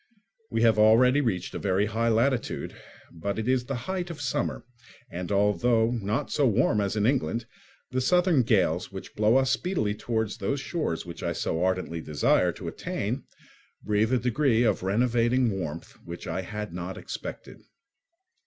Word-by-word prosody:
We 115 - 0
have 110 -2 +4
already 125 +6 +5
reached 95 -9 -2
a - - -4
very 100 +1 +1
high 110 +2 -1
latitude; 120 +3 0 0.4
but 100 +4 -4
it 110 +1 -3
is 130 -1 +2
the 135 - -3
height 185 -2 -3
of 165 -3 -7
summer, 135 -2 -2 0.5
and 90 +2 -5
although 105 +4 +2
not 110 -2 -2
so 145 -3 +3
warm 110 -1 +2
as 100 +1 -1
in 105 -1 +1
England, 120 -2 0 0.5
the 130 +1 0
southern 180 0 +3
gales, 95 -8 +1
which 95 -1 -9
blow 110 +4 +3
us 135 -1 +2
speedily 170 - 0
towards 110 0 -2
those 140 +8 -1
shores 135 - -3
which 85 -1 -8
I - - -1
so 80 +2 -1
ardently 90 -3 -1
desire 75 -2 +2
to - - -8
attain, - - -3 0.6
breathe 105 +2 +1
a 130 - +4
degree 125 -1 +2
of 110 -4 +1
renovating 120 +4 +2
warmth 85 -5 -5
which 85 0 -8
I 95 - -2
had 105 0 -6
not 90 +1 -5
expected. - - -8
110 Hz, 165 wpm, -27 LUFS, 95-125 Hz, 0.6 s, already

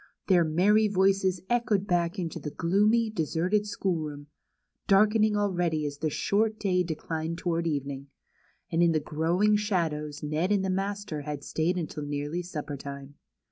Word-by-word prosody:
Their 180 -3 +4
merry 200 +7 +3
voices 190 -2 +2
echoed 220 -4 +1
back 175 0 0
into 170 -4 -3
the 150 - -5
gloomy, 210 +9 +2
deserted 180 +4 0
school 190 -3 -1
room, 145 -2 -6 0.6
dark 205 +2 +5
ening 215 -1 +2
already 175 -6 0
as 145 0 -5
the 155 +1 0
short 215 +7 0
day 185 -4 +1
declined 160 0 -3
toward 170 -1 -1
evening, 140 -2 -3 0.6
and 165 - +2
in 170 -1 +4
the 155 - +2
growing 170 +8 +1
shadows 160 -8 -2
Ned 155 +6 0
and 200 -2 +2
the 190 - 0
master 195 -4 -3
had 145 -1 -5
stayed 170 +6 -1
until 155 -3 -4
nearly 145 +4 -3
supper 150 -5 -5
time. 140 0 -8
175 Hz, 160 wpm, -28 LUFS, 155-200 Hz, 0.6 s, dark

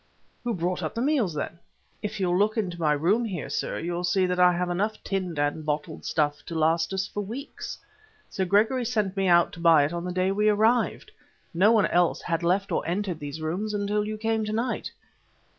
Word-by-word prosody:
"Who 240 -2 -1
brought 180 +1 -1
up - - -4
the 230 - -1
meals, 260 - +1
then?" 160 +3 -4 0.4
"If 210 0 -4
you'll 180 -2 +1
look 210 +4 +2
into 180 -5 -2
my 150 -2 +3
room 180 +11 +2
here, 190 -8 -4
sir, - - -2
you'll 175 +1 -3
see 185 +1 +2
that 180 0 -1
I 180 0 +7
have 175 0 -1
enough 210 +5 -2
tinned 185 -5 -3
and 145 +2 0
bottled 150 +1 -3
stuff 145 -2 0
to 170 - -5
last 165 +2 +2
us 190 0 -1
for 205 - -4
weeks. 235 +8 -7 0.5
Sir 190 - -2
Gregory 220 +7 +2
sent 215 -5 -1
me 195 -1 +1
out 175 -1 +5
to - - -9
buy 165 -3 +6
it 150 - -3
on 170 0 -3
the 180 - -3
day 185 +1 +1
we 210 +2 +2
arrived. 220 +4 +2 0.4
No 190 +6 +5
one 220 -4 +4
else 175 -1 +1
had 165 -1 -1
left 185 +3 +1
or - - 0
entered 180 -1 -2
these 145 +1 -6
rooms 190 +7 -2
until 205 +1 0
you 215 +1 -4
came 220 0 0
to 215 - -3
night." 230 +3 -2
185 Hz, 215 wpm, -26 LUFS, 170-210 Hz, 0.5 s, I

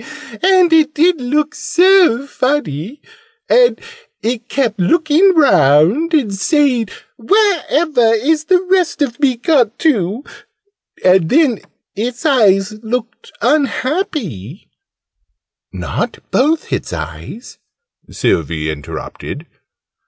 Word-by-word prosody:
And 370 -3 +3
it 310 -2 +3
did 330 0 +2
look 295 +4 -1
so 350 -7 +3
funny! 260 - -3 0.4
And - - +3 0.4
it 235 +2 -3
kept 235 -7 -1
looking 325 - +3
round, 270 - +3
and 240 -10 0
saying 250 +2 +1 0.3
'wherever 315 - +1
is 305 +7 0
the 365 +1 +2
rest 360 -5 +1
of 240 -3 -4
me 265 -5 +1
got 245 - +1
to?' 225 - 0 0.8
And 180 -3 +3
then 275 -7 +2 0.4
its 240 +7 -5
eyes 210 -8 +3
looked 240 +1 -5
unhappy 260 - -2 0.5
" - - -59
"Not - - -4
both 305 +4 0
its - - -3
eyes," 235 - -8 0.5
Sylvie 80 -1 -1
interrupted. 75 -2 -8
275 Hz, 100 wpm, -15 LUFS, 220-320 Hz, 0.8 s, And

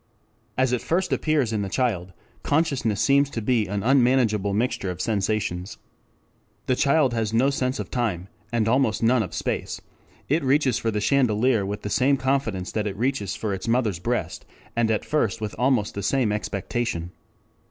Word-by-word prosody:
As 130 -1 +2
it 125 - 0
first 180 +3 0
appears 145 -8 +1
in 105 - 0
the 100 - -3
child, 95 -7 -1 0.3
consciousness 140 -9 0
seems 140 0 +3
to 115 - -4
be 110 -2 +1
an 100 +1 -3
unmanageable 120 -5 +3
mixture 105 -2 -1
of 90 - -5
sensations. 100 -3 -1 0.9
The 130 - +1
child 140 -2 +3
has 110 -2 -1
no 130 +4 +3
sense 130 -1 -1
of - - -5
time, 100 -8 -1 0.2
and 115 -2 +1
almost 115 -2 +2
none 120 +1 +4
of 100 - -5
space, - - -3 0.5
it 155 +3 +1
reaches 135 -2 +2
for 115 - -1
the 105 -1 -1
chandelier 120 -4 +2
with 105 +1 -5
the 105 - -3
same 135 +2 +3
confidence 130 -8 -1
that 105 -1 -1
it 100 -1 -5
reaches 120 -5 -1
for 105 -3 -3
its 95 +4 -5
mother's 115 -7 +1
breast, 90 - -2 0.3
and 115 -1 +2
at 110 - 0
first 130 -10 0
with 105 -1 -4
almost 125 -5 +2
the 100 - -4
same 120 +2 +1
expectation. 105 -3 -3
115 Hz, 175 wpm, -24 LUFS, 105-130 Hz, 0.9 s, none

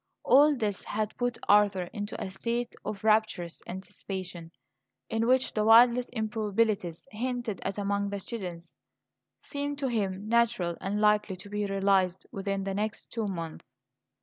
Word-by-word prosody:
All 290 +3 +6
this 210 -6 -2
had 215 0 -2
put 245 -1 -1
Arthur 205 -2 +5
into 205 -1 -5
a 190 - -4
state 235 +5 -2
of 210 -2 -5
rapturous 215 -6 +1
anticipation, 185 -2 -7 0.6
in 225 +1 +1
which 260 +1 +3
the 215 - +1
wildest 240 +3 +6
improbabilities 215 -5 -1
hinted 240 -2 -3
at 195 +1 -3
among 200 0 0
the 200 0 -3
students 180 -6 -7 0.7
seemed 285 0 -4
to 275 -2 -1
him 200 -3 -2
natural 230 -7 +2
and 200 +2 -1
likely 210 -2 +3
to 185 +3 -11
be 210 0 -1
realized 195 -2 +2
within 195 0 -2
the 195 0 -2
next 210 +2 -3
two 225 -2 -2
months. 165 -4 -5
210 Hz, 150 wpm, -29 LUFS, 195-230 Hz, 0.7 s, All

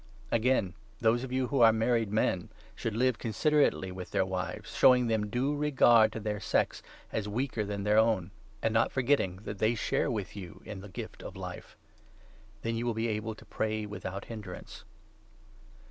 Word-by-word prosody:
Again, 115 -5 +2 0.3
those 115 +2 +2
of 130 - -6
you 130 -1 0
who 135 -3 +1
are 115 -1 +8
married 110 -1 +1
men 95 -4 +1 0.3
should 110 -2 -3
live 125 0 +2
7 - - -30
considerately 130 - +2
with 90 -1 -7
their - - +1
wives, 95 -1 -4
showing 125 -2 +6 0.2
due 130 +6 0
regard 130 -6 +5
to - - -4
their 105 -1 -3
sex, - - 0 0.3
as 105 -2 -1
weaker 115 0 -1
than 100 -1 -4
their 105 +1 +4
own, 110 -5 +2 0.3
and 110 - +1
not 115 +2 +3
forgetting 130 -8 +1
that 100 -2 -6
they 110 +2 +2
share 135 +6 0
with 105 - -3
you 90 -4 -9
in 100 -2 -7
the 100 - -10
gift - - -8
of - - -8
Life. - - -8 0.9
Then 115 0 -1
you 120 +1 -2
will 115 - 0
be 115 +1 0
able 110 +1 -3
to - - -15
pray 110 -1 -2
without 100 -2 -6
hindrance. 105 -5 -9
110 Hz, 180 wpm, -30 LUFS, 105-120 Hz, 0.9 s, are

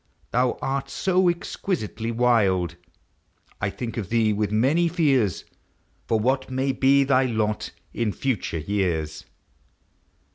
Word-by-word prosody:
Thou 125 +1 +1
art 135 0 -2
so 185 -1 +2
exquisitely 170 - -3
wild, 100 -8 +2 0.8
1 100 - 0
think 120 -2 -5
of 105 -6 -4
thee 110 -2 +2
with 105 0 -1
many 135 +11 +3
fears 140 - +1 0.6
For 110 - +2
what 130 +4 0
may 130 +1 0
be 135 +1 +4
thy 135 -1 +3
lot 110 -3 -1 0.2
in 115 -3 0
future 110 -9 -2
years. 80 -3 -2
115 Hz, 120 wpm, -24 LUFS, 105-135 Hz, 0.8 s, be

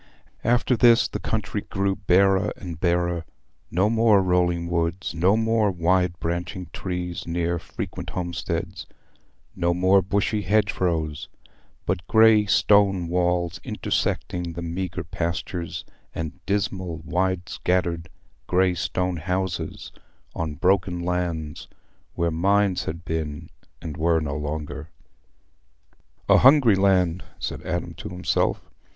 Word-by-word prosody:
After 120 +2 +2
this, 120 0 +5
the - - -5
country 105 -1 -2
grew 95 0 -1
barer 95 0 +3
and 85 -5 -7
barer: 85 -1 +1 0.5
no 95 +5 +2
more 110 -3 +4
rolling 90 -2 +1
woods, 85 +2 -1
no 90 +7 +3
more 110 -1 +2
wide 90 -1 +1
branching 85 +1 -4
trees 90 -2 -4
near 85 0 -1
frequent - - -6
homesteads, 85 -1 -4 0.7
no 85 0 +1
more 95 +2 +4
bushy 100 +3 0
hedgerows, 90 -7 0 0.6
but 90 -1 -2
greystone 105 -4 +4
walls 90 -1 0
intersecting 85 -1 -2
the 85 +1 -6
meagre 85 +1 -3
pastures, 85 +1 -4 0.3
and 80 -2 -5
dismal 95 -4 -1
wide 90 0 0
scattered 85 -2 -1 0.4
greystone 90 0 +1
houses 90 +2 -3 0.4
on 80 -2 -3
broken 90 +1 +1
lands 85 -4 -3 0.5
where 85 0 0
mines 100 +3 +2
had 85 +2 -5
been 80 -3 -4 0.3
and 75 -4 -6
were 80 +1 +2
no 75 -2 -3
longer. 75 +1 -5 1.4
"A - - +6
hungry 135 -4 +6
land," 95 -3 +2
said - - -4
Adam - - -3
to - - -6
himself. 90 +1 -1
90 Hz, 115 wpm, -24 LUFS, 85-95 Hz, 1.4 s, A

